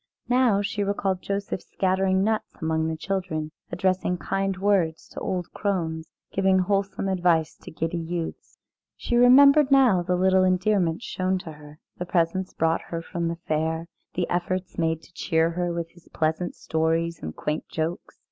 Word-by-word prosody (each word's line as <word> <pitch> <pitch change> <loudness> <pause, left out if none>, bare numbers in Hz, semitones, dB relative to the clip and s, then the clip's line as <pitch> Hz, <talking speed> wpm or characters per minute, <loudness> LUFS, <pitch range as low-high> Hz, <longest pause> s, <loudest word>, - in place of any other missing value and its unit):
Now 245 -5 +3
she 205 +1 -1
recalled 195 -2 -1
Joseph 200 -2 -3
scattering 190 0 +1
nuts 220 +1 -1
among 160 0 0
the 160 0 -3
children, 165 -4 -3 0.2
addressing 185 -1 0
kind 195 +3 -1
words 190 -5 +1
to - - -8
old 180 -2 -3
crones, 165 -5 -2 0.2
giving 190 0 +3
wholesome 195 +1 0
advice 175 -4 +2
to - - -12
giddy 165 +2 -3
youths. 165 0 -5 0.4
She 240 - -2
remembered 275 +4 +7
now 255 -10 +5
little 185 +1 +4
endearments 185 0 +1
shown 185 0 -1
to 160 - -8
her, 150 0 -13 0.2
the 180 - -4
presents 180 +2 0
brought 165 0 +1
her 165 -1 -4
from 170 0 -3
the 170 0 -3
fair, 160 +1 0 0.3
the 175 -1 0
efforts 180 +1 -2
made 160 -1 -1
to - - -19
cheer 165 -1 +1
her 175 0 -1
with 170 -1 -4
his 175 -1 -21
pleasant 160 +3 -1
stories 165 +1 -1
and 80 - -6
quaint 150 +1 -3
jokes. 165 +2 -4
180 Hz, 160 wpm, -25 LUFS, 165-195 Hz, 0.4 s, remembered